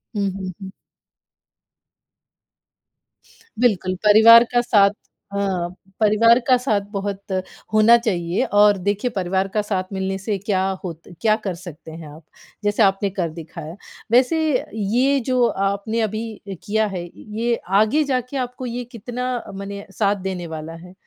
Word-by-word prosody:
हुँ, 200 Hz, -1 st, 0 dB
हुँ, 185 Hz, -1 st, -5 dB
हुँ। 190 Hz, 0 st, -7 dB, 2.9 s
बिल्कुल, 190 Hz, -6 st, +1 dB
परिवार 225 Hz, +3 st, +8 dB
का 240 Hz, -, +4 dB
साथ 205 Hz, -4 st, +4 dB, 0.4 s
हाँ, 190 Hz, -3 st, -1 dB, 0.3 s
परिवार 225 Hz, +3 st, +5 dB
का 255 Hz, -, +6 dB
साथ 220 Hz, -5 st, 0 dB
बहुत 200 Hz, -1 st, -4 dB, 0.5 s
होना 215 Hz, +2 st, +7 dB
चाहिए 180 Hz, -6 st, -1 dB, 0.2 s
और 205 Hz, -1 st, +6 dB
देखिए 205 Hz, +6 st, -1 dB
परिवार 190 Hz, +1 st, 0 dB
का 210 Hz, -, +2 dB
साथ 195 Hz, -3 st, -2 dB
मिलने 190 Hz, 0 st, -2 dB
से 200 Hz, +1 st, -2 dB
क्या 190 Hz, -4 st, +1 dB, 0.2 s
होत 165 Hz, -3 st, -6 dB, 0.2 s
क्या 215 Hz, -1 st, +4 dB
कर 190 Hz, -4 st, -3 dB
सकते 170 Hz, -3 st, -11 dB
हैं 160 Hz, -1 st, -9 dB
आप, 160 Hz, -, -15 dB, 0.4 s
जैसे 205 Hz, +1 st, +2 dB
आपने 195 Hz, +1 st, +2 dB
कर 180 Hz, -4 st, -2 dB
दिखाया। 160 Hz, 0 st, -9 dB, 0.4 s
वैसे 255 Hz, +6 st, +4 dB, 0.4 s
ये 245 Hz, +7 st, +1 dB
जो 255 Hz, -2 st, +2 dB
आपने 200 Hz, +3 st, -1 dB
अभी 220 Hz, +1 st, -3 dB
अ, 200 Hz, -1 st, -9 dB
किया 220 Hz, 0 st, +1 dB
है 185 Hz, -3 st, -5 dB
य -, -, -11 dB, 0.3 s
ये 235 Hz, 0 st, +1 dB, 0.3 s
आगे 285 Hz, +8 st, +2 dB
जाके 260 Hz, -1 st, -2 dB
आपको 250 Hz, 0 st, -4 dB
ये 245 Hz, +1 st, -4 dB
कितना 245 Hz, +2 st, -4 dB, 0.2 s
मने 200 Hz, +1 st, -7 dB
साथ 205 Hz, -1 st, +2 dB
देने 185 Hz, -2 st, -5 dB
वाला 160 Hz, 0 st, -7 dB
है? 180 Hz, +2 st, -12 dB
205 Hz, 150 wpm, -21 LUFS, 190-230 Hz, 2.9 s, परिवार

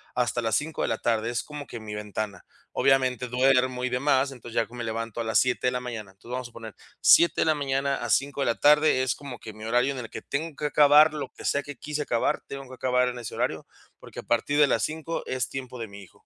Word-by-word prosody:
hasta 120 Hz, -1 st, 0 dB
las 115 Hz, -1 st, 0 dB
5 155 Hz, +2 st, -2 dB
de -, -, +1 dB
la -, -, 0 dB
tarde. 115 Hz, 0 st, 0 dB
Es 120 Hz, -, -2 dB
como 150 Hz, -1 st, -8 dB
que 120 Hz, -, -7 dB
mi 110 Hz, -1 st, -8 dB
ventana. 105 Hz, 0 st, -5 dB, 0.3 s
Obviamente, 130 Hz, -2 st, +2 dB
duermo 125 Hz, 0 st, +2 dB
y -, -, 0 dB
demás. 135 Hz, +1 st, +2 dB
Entonces 120 Hz, -3 st, -11 dB
ya 115 Hz, -, +2 dB
que 120 Hz, -, -19 dB
me 120 Hz, -, -5 dB
levanto 115 Hz, 0 st, -4 dB
a -, -, -1 dB
las 110 Hz, 0 st, +1 dB
7 125 Hz, 0 st, +2 dB
de -, -, +3 dB
la 125 Hz, -, -2 dB
mañana. 115 Hz, -5 st, -6 dB
Entonces, 105 Hz, +5 st, -15 dB
vamos 125 Hz, 0 st, -3 dB
a 120 Hz, -, -8 dB
suponer, 110 Hz, -3 st, -10 dB, 0.3 s
7 170 Hz, -, +6 dB
de -, -, +3 dB
la 160 Hz, -, +4 dB
mañana 140 Hz, -1 st, 0 dB
a -, -, -5 dB
5 140 Hz, +1 st, +1 dB
de -, -, +1 dB
la 115 Hz, -, +2 dB
tarde, 150 Hz, -2 st, +4 dB
es 130 Hz, -, +1 dB
como 140 Hz, -4 st, -8 dB
que 110 Hz, -, -9 dB
mi 110 Hz, +1 st, -11 dB
horario 125 Hz, +4 st, +2 dB
en 130 Hz, -, -6 dB
el 115 Hz, -, -7 dB
que -, -, -7 dB
tengo 150 Hz, +2 st, -3 dB
que 150 Hz, -, -4 dB
acabar 150 Hz, +1 st, +6 dB
lo 150 Hz, -2 st, -5 dB
que -, -, -9 dB
sea 140 Hz, -, +1 dB
que 145 Hz, -, -8 dB
quise 150 Hz, +4 st, -4 dB
acabar, 120 Hz, -4 st, 0 dB
tengo 135 Hz, -1 st, -7 dB
que 130 Hz, -, -12 dB
acabar 125 Hz, 0 st, +1 dB
en 125 Hz, 0 st, -6 dB
ese 115 Hz, -, -7 dB
horario, -, -, -2 dB, 0.3 s
porque -, -, -10 dB
a -, -, -7 dB
partir 120 Hz, +5 st, 0 dB
de 150 Hz, -, +8 dB
las -, -, +1 dB
5, 160 Hz, +1 st, -3 dB
es 130 Hz, -4 st, -2 dB
tiempo 130 Hz, -2 st, -6 dB
de 115 Hz, -, -4 dB
mi 100 Hz, 0 st, -11 dB
hijo. 95 Hz, -, -18 dB
125 Hz, 270 wpm, -26 LUFS, 115-140 Hz, 0.3 s, de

